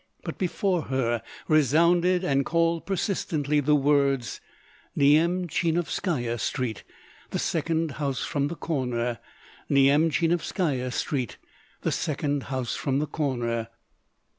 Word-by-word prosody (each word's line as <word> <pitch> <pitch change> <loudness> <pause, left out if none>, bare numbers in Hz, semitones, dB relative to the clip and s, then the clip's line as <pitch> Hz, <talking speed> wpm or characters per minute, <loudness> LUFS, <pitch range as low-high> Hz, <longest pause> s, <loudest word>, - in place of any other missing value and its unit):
But - - -6
before 180 -2 0
her 120 -3 0 0.3
resounded 170 +5 +4
and 140 -5 +2
called 165 +2 +1
persistently 160 -6 0
the 150 +1 +3
words: 140 -3 +1 0.6
"Nyemchinovskaya 160 - +1
Street, 115 -1 -2 0.5
the - - -2
second 160 0 0
house 140 -3 -2
from 140 -1 0
the 170 - -5
corner. 125 -8 -2 0.5
Nyemchinovskaya 150 0 +2
Street, 130 -3 -2 0.5
the - - +1
second 145 -2 -1
house 130 -3 -2
from 135 -1 -1
the 150 - +1
corner." 120 -7 -2
145 Hz, 105 wpm, -26 LUFS, 130-165 Hz, 0.6 s, resounded